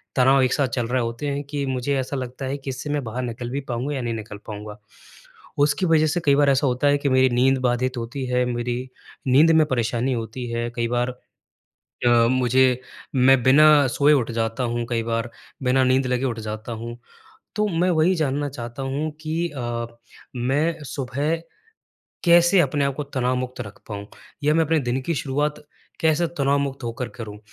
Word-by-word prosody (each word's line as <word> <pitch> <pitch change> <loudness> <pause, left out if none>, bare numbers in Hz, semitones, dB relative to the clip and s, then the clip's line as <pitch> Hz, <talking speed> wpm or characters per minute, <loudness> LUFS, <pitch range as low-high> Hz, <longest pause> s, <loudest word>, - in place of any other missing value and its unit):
तनाव 135 +1 +5
एक 130 - +2
साथ 140 -3 +1
चल 120 -1 -2
रहे 125 +1 0
होते 115 +4 -3
हैं 140 0 -2
कि 140 0 -3
मुझे 130 +1 -1
ऐसा 130 +2 -3
लगता 130 +1 -5
है 135 +2 -2
कि 135 -1 -7
इससे 130 +3 -5
मैं 145 -1 -1
बाहर 120 +2 -4
निकल 120 0 -5
भी 140 - -2
पाऊँगा 130 +5 -2
या 135 - -2
नहीं 120 -1 -2
निकल 110 -2 -7
पाऊँगा। 105 0 -7 0.8
उसकी 150 +6 +2
वजह 155 -1 +4
से 160 +4 0
कई 140 -1 +5
बार 145 0 +4
ऐसा 140 +1 +3
होता 125 +3 +1
है 145 0 +4
कि 140 - 0
मेरी 130 0 +4
नींद 130 +2 +3
बाधित 125 0 0
होती 120 +3 -4
है, 125 0 +1
मेरी 120 +1 -3 0.4
नींद 145 +6 +6
में 160 -1 +5
परेशानी 120 0 0
होती 115 +1 -4
है, 120 0 -2
कई 115 -1 0
बार 120 +1 0 1.0
अ, - - +7 0.2
मुझे 130 0 +3 0.4
मैं 130 0 +5
बिना 145 +2 +6
सोए 145 +4 +3
उठ 130 -5 +2
जाता 115 +2 -1
हूँ 120 0 -1
कई 115 -1 0
बार, 115 +1 -2 0.3
बिना 130 +1 +3
नींद 130 +1 +2
लगे 125 +1 0
उठ 120 -3 -2
जाता 110 +2 -6
हूँ। 115 +1 -6 0.6
तो 210 0 +2
मैं 180 0 +1
वही 170 +2 +3
जानना 145 -2 0
चाहता 120 -1 -7
हूँ 140 +4 -2
कि 165 +2 -1
अ, 120 -2 -3 0.5
मैं 145 +7 0
सुबह 140 +3 -2 0.9
कैसे 175 +2 +6
अपने 145 -1 0
आप 140 -1 -1
को 150 - -3
तनावमुक्त 130 -2 -2
रख 100 -4 -10
पाऊँ, 100 -1 -6 0.4
या 150 +1 +3
मैं 165 0 +3
अपने 160 +1 +2
दिन 125 -1 -1
की 165 +6 -2
शुरुआत 145 +2 -2 0.4
कैसे 160 +1 +3
तनावमुक्त 140 -1 0
होकर 120 +1 -4
करूँ, 110 -4 -8
130 Hz, 190 wpm, -23 LUFS, 120-145 Hz, 1.0 s, अ